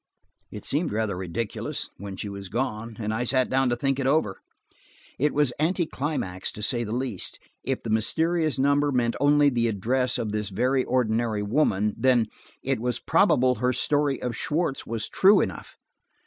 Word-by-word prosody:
It - - -9
seemed 155 +4 -1
rather 105 -2 -1
ridiculous, 95 +4 -4
when 100 0 -7
she 105 - -5
had 100 -1 -7
gone, 115 0 -3
and 110 -1 -2
I 115 +3 -1
sat 130 +1 +2
down 130 0 +2
to 120 - +1
think 135 +2 -1
it 135 - 0
over. 135 -9 +1 0.8
It 150 +3 +2
was 145 -4 +1
anticlimax, 155 - -1
to 105 - -7
say 120 +1 +1
the 105 - -5
least. 120 -5 -2 0.3
If 135 0 -2
the 115 - -3
mysterious 160 +8 +1
number 145 +2 +2
meant 120 -3 +1
only 145 0 +5
the 120 -2 +1
address 120 +5 0
of 110 -2 -2
this 105 -1 -2
very 125 +6 +1
ordinary 115 -3 0
woman, 105 -3 +1
then–it 130 +1 0
was 125 -1 -1
probable 125 0 +3
her 125 0 +2
story 145 0 +1
of 125 -2 -3
Schwartz 150 +1 -2
was 110 -1 -3
true 195 +2 +5
enough. - - -4
125 Hz, 170 wpm, -25 LUFS, 110-140 Hz, 0.8 s, only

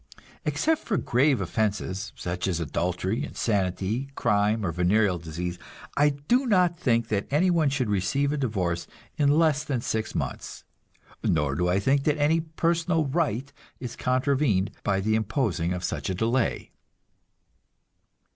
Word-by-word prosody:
Except 320 -1 +1
for 210 - 0
grave 135 +2 +2
offenses, 100 -2 -2
such 90 +1 -3
as 90 -3 -1
adultery, 90 - -1
insanity, 100 +4 -1
crime 105 +1 +1
or 85 - 0
venereal 90 +2 +2
disease, 85 +2 -5 0.4
I 145 +1 +4
do 190 - 0
not 180 -5 +3
think 115 -9 +1
that 100 -2 -1
anyone 160 0 +3
should 135 -3 -1
receive 105 +9 +1
a 150 - -1
divorce 95 -10 -1 0.3
in 145 0 +4
less 155 -3 +3
than 140 -5 -1
six 110 -1 -2
months, - - -4 0.6
nor 75 -3 +1
do 90 +5 0
I 95 +2 +2
think 135 +7 +1
that 150 -1 +2
any 150 +3 +3
personal 165 0 0
right 140 -3 -1 0.3
is 125 -3 -6
contravened 130 -6 +1
by 95 -1 +1
the 110 +2 +1
imposing 110 - 0
of 90 0 -3
such - - -3
a 95 - -1
delay. 115 +5 0
115 Hz, 145 wpm, -26 LUFS, 95-145 Hz, 0.6 s, I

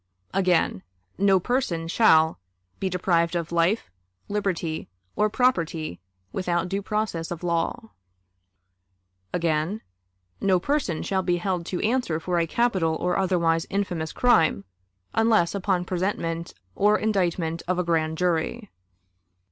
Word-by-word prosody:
Again: 180 - +2 0.4
"No 195 -1 +5
person 180 -7 -1
shall... 160 - +4 0.4
be 190 - -1
deprived 175 -2 +1
of 170 -1 -2
life, 170 - +1 0.4
liberty, 185 -6 -2 0.3
or 210 - +2
property, 170 - 0 0.3
without 175 -2 0
due 195 +2 -2
process 205 -6 -2
of 175 0 -6
law." 175 +6 -1 1.4
Again: 170 +5 0 0.6
"No 190 -2 +3
person 230 - -1
shall 190 -1 0
be 175 -1 +1
held 175 -1 -2
to 180 - -2
answer 220 -9 0
for 175 +1 -1
a 165 - +1
capital 190 -6 +1
or 180 +2 -1
otherwise 170 -3 +1
infamous 180 -5 -2
crime, 165 - +3 0.5
unless 225 -6 +3
on 190 -2 0
a - - -6
presentment 170 -3 -2 0.2
or 210 - +3
indictment 175 -6 0
of 180 0 0
a 180 - +1
grand 160 -2 0
jury." 180 +6 -1
180 Hz, 125 wpm, -25 LUFS, 165-200 Hz, 1.4 s, No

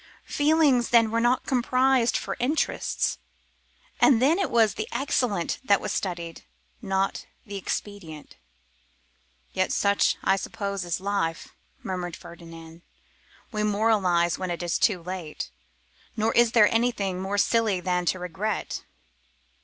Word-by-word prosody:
Feelings 290 -5 +3
then 230 -2 +4
were 230 - +1
not 240 +2 +2
compromised 255 -1 +2
for - - -4
interests; 285 +6 -1 0.8
and 260 -7 +5
then 300 +9 +3
it 385 - 0
was 225 -3 +3
the 215 - -4
excellent 240 -10 -1
that 200 -6 +3
was - - -3
studied, 170 -3 -4 0.4
not 195 -2 -1 0.2
the 205 - -8
expedient. 190 -5 -6 1.2
'Yet 185 0 0
such 200 0 +2
I 195 - +3
suppose 200 -1 -4
is 175 0 -2
life,' 190 -4 -2 0.3
murmured 180 -3 -4
Ferdinand; 165 -1 -12 0.7
'we 215 -2 -2
moralise 200 -5 +2
when 185 -1 -3
it 175 0 -3
is 175 - -1
too 185 -6 +2
late; 180 -4 -6 0.7
nor 220 +1 +1
is 235 -1 +4
there 215 -3 +7
anything 205 -6 0
more 195 +2 -2
silly 220 -2 +2
than 180 0 -1
to 185 - +2
regret. 180 +4 -4
200 Hz, 130 wpm, -26 LUFS, 180-230 Hz, 1.2 s, there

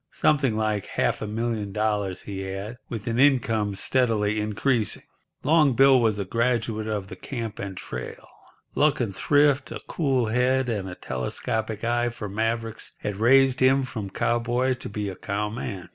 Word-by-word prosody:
Something 135 -7 +2
like 110 -2 -1
half - - 0
a 110 - -3
million 110 -1 -2
dollars 105 -3 -1
he 100 -1 -6
had, 95 +5 -5
with 110 -4 -5
an 115 +1 -1
income 115 -7 +3
steadily 110 -3 +2
increasing. 110 +2 0 0.4
Long 150 -2 +4
Bill 135 +1 +6
was 110 -3 +2
a 100 - -2
graduate 115 0 0
of 105 -3 -2
the 95 - -9
camp 115 +1 -6
and 95 -2 -5
trail. - - -7 0.5
Luck 150 0 +2
and 110 -6 -2
thrift, 145 +1 +3
a - - -5
cool 135 -7 +1
head, 125 +3 +1
and 100 -4 -2
a 90 - -7
telescopic 110 - -3
eye 120 +1 +1
for 115 -3 -6
mavericks 115 +2 -3
had 105 -2 -4
raised 130 +3 +4
him 130 +1 +4
from 110 -6 -5
cowboy 120 +4 +1
to 125 - -7
be 105 0 -3
a 95 - -5
cowman. 105 -1 -4
115 Hz, 165 wpm, -25 LUFS, 105-125 Hz, 0.5 s, Bill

